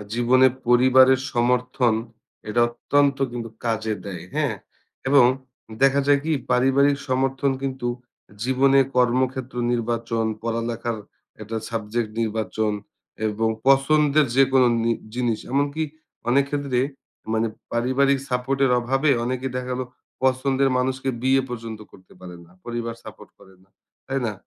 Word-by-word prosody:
আ - - -6
জীবনে 125 +2 +4 0.2
পরিবারের 130 +1 +6
সমর্থন, 125 0 +1 0.5
এটা 120 +3 +1
অত্যন্ত 140 +3 +1
কিন্তু 120 -1 -5 0.2
কাজে 110 -1 -1
দেয়, 90 -4 -6
হ্যাঁ? - - 0 0.5
এবং 140 -2 +6 0.6
দেখা 135 +1 +5
যায় 145 -1 +4
কি 160 - 0 0.2
পারিবারিক 135 +3 +3
সমর্থন 135 +1 +1
কিন্তু 130 -2 -3 0.6
জীবনে 135 +2 +4 0.2
কর্মক্ষেত্র 130 +1 +1 0.2
নির্বাচন, 115 -1 -1 0.2
পড়ালেখার 115 0 -2 0.4
একটা 110 +1 -5
সাবজেক্ট 115 0 -2
নির্বাচন 110 -1 -1 0.5
এবং 110 +1 0 0.2
পছন্দের 145 +2 +4
যেকোনো 135 -1 +5 0.2
নি 115 +1 +2 0.2
জিনিস 120 -3 0
এমনকি 145 +3 0 0.5
অনেক 135 +3 +4
ক্ষেত্রে 140 -4 -1 0.5
মানে 115 0 +1 0.3
পারিবারিক 130 +3 +2
সাপোর্ট 125 +2 -1
এর 130 - +3
অভাবে 135 +5 +1
অনেকে 130 +2 -3
দেখা 125 0 -4
গেলো 125 0 -2 0.4
পছন্দের 130 +1 +2
মানুষকে 130 +1 -1
বিয়ে 135 +1 +3
পর্যন্ত 115 -3 -6
করতে 95 -1 -18
পারে 90 -1 -9
না। 85 - -22
পরিবার 120 -1 -4
সাপোর্ট - - -12
করে 95 - -18
না, 95 - -34 0.4
তাই 135 0 -2
না? 110 - -2
125 Hz, 130 wpm, -23 LUFS, 115-135 Hz, 0.6 s, পরিবারের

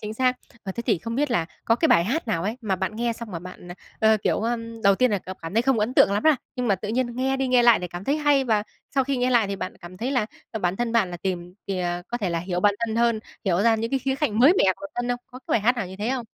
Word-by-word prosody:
chính 215 0 -5
xác. 255 +1 +2 0.3
Ờ, 195 - -5
thế 235 - -5
thì 215 -9 +2
không 230 +6 -5
biết 290 +1 0
là 175 -9 +1 0.2
có 230 - +4
cái 320 - +2
bài 170 - +5
hát 260 - -2
nào 165 -7 0
ấy, 210 +5 -2
mà 205 -5 -1
bạn 190 +3 -3
nghe 235 +1 0
xong 230 -1 -8
mà 175 - -4
bạn, 180 +1 -11
ờ, 175 - -7 0.4
ờ, 220 - +5
kiểu, - - +1
ờm, 230 0 -3
đầu 200 -1 +5
tiên 255 +4 +2
là 205 - +1
cảm 185 +1 -9
cảm 165 +4 -6
thấy 230 - +3
không 265 -2 +2
ấn 215 +4 0
tượng 200 - +5
lắm, 205 - 0
a, 310 -2 +6 0.2
nhưng 250 -1 -1
mà 200 - +4
tự 200 +3 -6
nhiên 240 +1 -1
nghe 265 +1 0
đi 265 -1 -1
nghe 250 -1 +4
lại 235 -2 +6
thì 180 - -4
cảm 175 +2 -7
thấy 280 +6 +1
hay, 290 -3 +3
và 220 -4 +2 0.3
sau 270 -1 +3
khi 275 0 -1
nghe 250 0 +1
lại 235 -4 +4
thì 195 0 -3
bạn 185 - -5
cảm 175 +1 -10
thấy 240 +7 -3
là, 250 -6 +1 0.2
ờ, 220 - -4
bản 180 0 0
thân 240 0 -1
bạn 220 -6 +2
là 175 - -5
tìm 180 0 -4
thì, 195 -2 -2
ờ, 175 0 -2
có 240 - -3
thể 195 -6 -1
là 170 - 0
hiểu 180 +1 -3
bản 205 +1 +4
thân 220 0 -3
hơn, 235 -2 +2 0.2
hiểu 185 -1 +2
ra 230 0 +4
những 225 +1 -3
cái 270 - +1
khía 265 +1 -1
cạnh 265 -7 -1
mới 270 +8 +7
mẻ - - +4
của 295 - -7
bản - - -25
thân 245 0 -2
không? 245 0 0
Có 255 - -11
cái 260 - -6
bài 225 - +3
hát 245 +4 +2
nào 235 - -2
như 185 +1 -9
thế 210 +4 -2
không? 260 -2 -2
225 Hz, 335 wpm, -24 LUFS, 190-250 Hz, 0.4 s, mới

